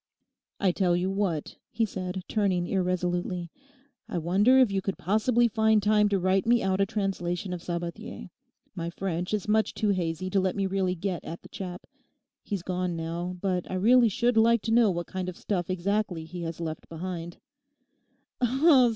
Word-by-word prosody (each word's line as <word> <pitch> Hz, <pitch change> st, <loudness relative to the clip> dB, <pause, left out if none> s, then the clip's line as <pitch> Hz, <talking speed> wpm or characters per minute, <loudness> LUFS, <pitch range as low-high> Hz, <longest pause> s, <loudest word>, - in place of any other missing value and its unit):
'I 190 Hz, -, +3 dB
tell 175 Hz, -1 st, +2 dB
you 180 Hz, +2 st, 0 dB
what,' 195 Hz, -6 st, -2 dB
he 230 Hz, -, 0 dB
said, 185 Hz, -2 st, -5 dB
turning 190 Hz, -5 st, +1 dB
irresolutely, 180 Hz, -1 st, -1 dB, 0.6 s
'I -, -, -2 dB
wonder 195 Hz, +10 st, +4 dB
if 255 Hz, -5 st, +5 dB
you 195 Hz, -1 st, 0 dB
could 195 Hz, 0 st, -3 dB
possibly 225 Hz, +5 st, +2 dB
find 220 Hz, -1 st, +3 dB
time 210 Hz, 0 st, +4 dB
to 200 Hz, -, +2 dB
write 185 Hz, +2 st, +1 dB
me 240 Hz, 0 st, +4 dB
out 190 Hz, 0 st, +1 dB
a 195 Hz, -, +3 dB
translation 190 Hz, -3 st, -2 dB
of 175 Hz, -, -5 dB
Sabathier. 170 Hz, -, -5 dB, 0.4 s
My 170 Hz, 0 st, -4 dB
French 180 Hz, 0 st, -3 dB
is 210 Hz, -2 st, -1 dB
much 220 Hz, +1 st, +2 dB
too 215 Hz, -, 0 dB
hazy 180 Hz, -2 st, -1 dB
to 195 Hz, -, +3 dB
let 185 Hz, -1 st, 0 dB
me 195 Hz, -, 0 dB
really 190 Hz, -1 st, 0 dB
get 185 Hz, 0 st, -3 dB
at 170 Hz, -, -7 dB
the -, -, -13 dB
chap. 180 Hz, -2 st, -7 dB, 0.6 s
He's 200 Hz, -4 st, -4 dB
gone 180 Hz, -1 st, -2 dB
now; 170 Hz, +2 st, -4 dB
but 185 Hz, -3 st, -1 dB
I -, -, -3 dB
really 235 Hz, +5 st, +5 dB
should 240 Hz, +3 st, +1 dB
like 230 Hz, 0 st, +4 dB
to 225 Hz, -, -2 dB
know 235 Hz, -2 st, +5 dB
what 175 Hz, -2 st, -2 dB
kind 185 Hz, -1 st, -4 dB
of 180 Hz, -, -8 dB
stuff 180 Hz, -4 st, -2 dB
exactly 185 Hz, -2 st, -1 dB
he 175 Hz, +2 st, -7 dB
has 165 Hz, -1 st, -5 dB
left 160 Hz, -2 st, -5 dB
behind. 170 Hz, 0 st, -6 dB
185 Hz, 180 wpm, -27 LUFS, 175-205 Hz, 0.6 s, if